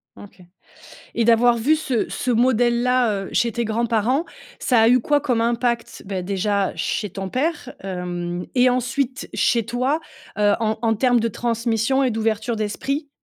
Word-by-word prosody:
Mmh. - - -12
OK 200 -2 -16 0.7
et 230 - +1
d'avoir 235 +1 +4
vu 275 +8 +3
ce 265 -7 -1
ce 250 - -2
modèle-là, 240 -2 +2
heu, - - -8
chez 235 - +2
tes 235 +1 -2
grands-parents, 230 +5 +1 0.4
ça 245 -4 +3
a 225 - +5
eu 250 +1 +5
quoi 290 +4 +2
comme 250 -5 0
impact, 235 0 -1
beh, 190 -1 -3
déjà 200 +1 0
chez 200 +5 -2
ton 195 +1 -6
père, 285 - -2
hem 180 -2 -4
et 250 0 +5
ensuite 255 +1 -2
chez 230 -3 +1
toi? 250 +6 0 0.4
Heu, 205 -1 +3
en 220 -1 0
en 225 -1 +2
termes 245 +2 +3
de 230 - 0
transmission 230 +3 0
et 255 - +1
d'ouverture 225 +1 -1
d'esprit? 275 +8 -3
235 Hz, 170 wpm, -22 LUFS, 215-250 Hz, 0.7 s, a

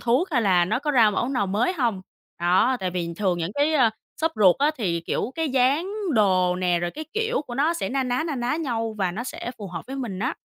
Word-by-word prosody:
thuốc 255 +11 +1
hay 250 -7 +2
là 180 -4 +4
nó 215 +7 0
có 295 +1 -2
ra 235 -6 +5
mẫu 240 +4 -1
nào 250 -7 0
mới 210 - +1
hông? 235 - -1 0.4
Đó, 185 +9 +3
tại 185 -1 -1
vì 170 -2 -3
thường 185 -3 0
những 165 +1 -2
cái, 290 +2 +2
ơ, 250 -6 +4 0.3
shop 320 0 +1
ruột 190 -4 +5
á 290 +2 +3
thì, 175 -8 -1
kiểu, 215 +8 -3
cái 325 -1 -1
dáng 270 +8 +2 0.2
đồ 185 -4 +3
nè 180 -1 +1
rồi 175 0 -2
cái 310 - -7
kiểu 445 -3 0
của 240 - -6
nó 300 +6 +2
sẽ 335 - -2
na 270 +1 0
ná, 250 +1 -1
na 315 - -2
ná 250 +3 -1
nhau 230 -8 -2
và 190 -3 +1
nó 225 +7 -5
sẽ 245 - -5
phù 205 - -6
hợp 170 -2 -7
với 270 - -6
mình 230 -9 -4
á. 255 +9 -2
235 Hz, 255 wpm, -24 LUFS, 185-275 Hz, 0.4 s, ra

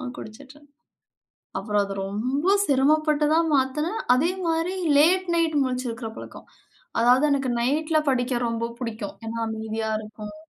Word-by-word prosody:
குடிச்சிட்டுருந்தேன் 280 +6 -12 0.9
அப்பறம் 205 0 0
அது 195 0 -6
ரொம்ப 265 - +1
சிரமப்பட்டு 300 +2 +2
தான் 330 0 +3
மாத்துனே. 300 +7 0 0.2
அதேமாரி 335 +3 0 0.2
லேட் 365 +5 +4
நைட் 325 -2 +1
முழிச்சிக்கிற 250 -3 -3
பழக்கம். - - -11 0.5
அதாவது 250 +4 +4
எனக்கு 270 -2 0
நைட்ல 310 +5 +1
படிக்க 245 -1 0
ரொம்ப 230 0 -2
புடிக்கும். 220 -4 -5
ஏன்னா, 230 +1 -4
அமைதியா 220 0 -4
இருக்கும். 215 +2 -9
260 Hz, 120 wpm, -24 LUFS, 225-310 Hz, 0.9 s, லேட்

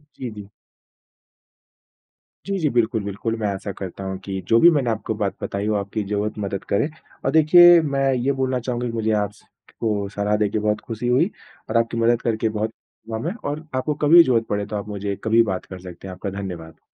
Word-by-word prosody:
जी, 125 - -5
जी। 105 -2 -10 2.0
जी, 195 0 -1
जी। 155 - +1
बिल्कुल, 115 -3 +1
बिल्कुल, 100 +3 -3
मैं 105 - 0
आशा 100 0 -3
करता 95 0 -6
हूँ 95 0 -4
कि 95 -1 -3
जो 115 0 +5
भी 170 - +8
मैंने 140 -6 +1
आपको 110 0 -2
बात 100 -2 -2
बताई, 100 +1 -2
वो 110 - +1
आपकी 100 +1 -2
ज़रूर 105 +1 -2
मदद 100 -1 -3
करे। 100 +9 +1 0.4
और 135 - +2
देखिए, 170 +3 +8
मैं 135 -3 +1
ये 130 +2 +1
बोलना 130 -1 0
चाहूँगा 125 0 -3
कि 115 - -5
मुझे 110 -1 0
आप 100 - -4
स - - -22 0.4
को 105 -3 -1
सलाह 105 +1 0
देके 105 0 0
बहुत 105 0 0
खुशी 115 +2 -4
हुई 130 +10 +3 0.4
और 115 - +2
आपकी 115 0 0
मदद 115 +1 +2
करके 110 -1 0
बहुत 110 +1 -2 0.4
हुआ 110 - -2
मैं 165 - -3 0.2
और 150 +2 -4
आपको 130 +4 0
कभी 150 +2 +4
भी 170 - +11
ज़रूरत 115 -5 +2
पड़े, 105 0 -1
तो 105 - -6
आप 105 0 -4
मुझे 100 -1 -3
कभी 110 +1 +2
भी 115 - +7
बात 95 -4 -3
कर 95 - -9
सकते 90 +1 -10
हैं। 95 - -6
आपका 95 +2 -5
धन्यवाद। 90 -5 -7
110 Hz, 220 wpm, -22 LUFS, 100-125 Hz, 2.0 s, भी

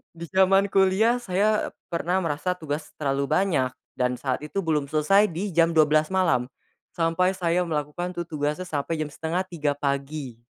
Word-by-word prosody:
di 165 - -8
zaman 195 +1 +4
kuliah 195 +5 +3
saya, 210 0 +1
eee, - - -12 0.2
pernah 175 +2 0
merasa 165 +3 -1
tugas 155 -3 -4
terlalu 140 -1 -1
banyak, 145 -8 +1 0.2
dan 125 0 +1
saat 130 +1 -2
itu 150 +7 -4
belum 150 -4 0
selesai 175 +8 +3
di 190 +4 -4
jam 165 0 +3
12 155 0 +4
malam, 175 -10 +1 0.5
sampai 180 +3 +1
saya 175 -1 +1
melakukan 160 +4 -3
tu 175 - -2
tugasnya 150 +1 -2
sampai 160 -2 -3
jam 155 -1 -3
2.30 160 -2 -2
pagi. 140 -3 -3
165 Hz, 160 wpm, -25 LUFS, 145-185 Hz, 0.5 s, zaman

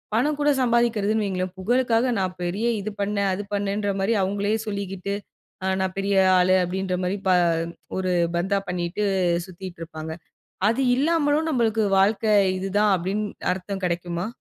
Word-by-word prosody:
பணம் 290 +6 +1
கூட 295 - +3
சம்பாதிக்கிறதுன்னு 230 -3 +2
வையுங்களேன், 185 -1 -2
புகழுக்காக 245 +3 +2
நான் 185 -1 -2
பெரிய 195 +7 -1
இது 215 +2 -4
பண்ணேன், 200 -1 0
அது 200 +2 -3
பண்ணேன்ற 205 0 -1
மாரி 215 +4 +2
அவங்களையே 205 +3 0
சொல்லிக்கிட்டு. 200 -1 -3 0.5
ஆ - - 0 0.2
"நான் 190 -1 -2
பெரிய 200 +1 0 0.2
ஆளு" 185 +1 +4
அப்டின்ற 185 +1 -2
மாரி 190 +3 -1
பா 185 - +5 0.6
ஒரு 185 -1 0 0.2
பந்தா 195 +3 +1
பண்ணிட்டு 180 +3 -2 0.4
சுத்திட்டு 185 -1 -9
இருப்பாங்க. 160 -1 -7 0.6
அது 230 +4 +1 0.2
இல்லாமலும் 305 +1 +2
நம்மளுக்கு 230 -5 +1 0.2
வாழ்க்கை 210 +2 +3 0.3
இதுதான் 200 +2 +2
அப்டின்னு 195 +4 -2 0.3
அர்த்தம் 190 +1 -6
கெடைக்குமா? 175 0 -2
200 Hz, 140 wpm, -24 LUFS, 185-220 Hz, 0.6 s, பா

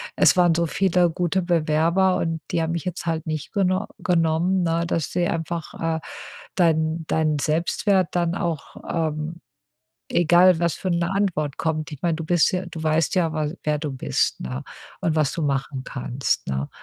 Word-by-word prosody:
es - - +5
waren 175 -2 +5
so 170 - +2
viele 180 -1 +2
gute 175 +2 0
Bewerber 170 +2 +2
und 165 -1 -2
die 165 - +1
haben 160 - -1
mich 170 - -3
jetzt 180 -1 -4
halt 165 -1 -2
nicht 155 -2 -4
geno 190 0 +1
genommen.“ 175 0 +2
Ne, 165 0 +1
dass 165 -4 -1
sie 175 -1 +1
einfach, 165 0 -3 0.2
äh, - - -5 0.6
dein 160 -2 +2
deinen 155 -2 +1
Selbstwert 170 +5 +1
dann 175 -1 0
auch, 170 -5 -3 0.2
ähm, 160 0 -2 0.7
egal, 175 +1 +5
was 170 -2 +1
für 185 - -3
'ne 170 0 +1
Antwort 165 -8 0
kommt 155 -1 -2
ich 140 - -9
meine, 170 -2 +1
du 165 - -5
bist 175 0 +3
ja 185 0 -2
du 160 - -7
weißt 155 0 +1
ja, 165 -3 +2
wa 155 -1 -1 0.2
wer 150 -1 +1
du 150 -2 -4
bist, 95 - -1
ne, 65 +1 -5 0.4
und 160 - 0
was 150 -3 +2
du - - -4
machen 135 -1 -2
kannst, 130 +1 -2
ne? 65 +1 -2
165 Hz, 180 wpm, -23 LUFS, 155-175 Hz, 0.7 s, es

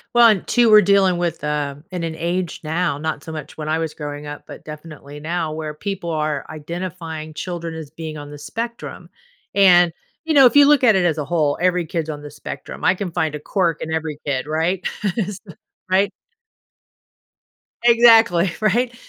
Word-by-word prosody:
Well, 235 -1 +8
and 210 -5 +2
two, 240 -1 +3
we're 210 0 +8
dealing 195 -1 +3
with 175 -1 -2
uh 150 -2 -2 0.2
in 180 -2 -4
an 165 -1 -3
age 175 +2 -2
now, 160 -1 -1
not 155 -1 -4
so 160 - -7
much 150 -1 -8
when 155 -1 -5
I 160 - +1
was 160 -1 -3
growing 145 -1 -6
up, 145 0 -8
but - - -11
definitely 150 -1 -10
now 160 0 -2
where 155 -1 -4
people 175 +2 -5
are 155 -2 -1
identifying 160 0 -6
children 170 0 -5
as 160 -2 -7
being 160 -1 -7
on 145 0 -9
the 145 - -9
spectrum. 230 +10 -6 0.5
And, 180 -3 +6 0.3
you 320 - 0
know, 275 -2 +8
if 245 - +6
you 285 0 +8
look 290 -2 +4
at 220 -5 +6
it 180 -2 +2
as 160 -3 +1
a 150 - -3
whole, 150 -2 +1
every 180 -2 +2
kid's 160 -1 -3
on 150 - -6
the 145 0 -9
spectrum. 145 0 -8
I 185 - +4
can 185 -2 -4
find 160 -3 -1
a 150 - -5
quirk 170 0 0
in 160 - -5
every 160 -2 -3
kid, 135 -2 -1
right? 165 +5 -1 0.3
Is 205 -3 -2
th 180 -7 -14 0.3
right? 195 +2 +3 1.7
Exactly, 225 -7 +6
right? 235 +4 +1
165 Hz, 195 wpm, -20 LUFS, 155-190 Hz, 1.7 s, Well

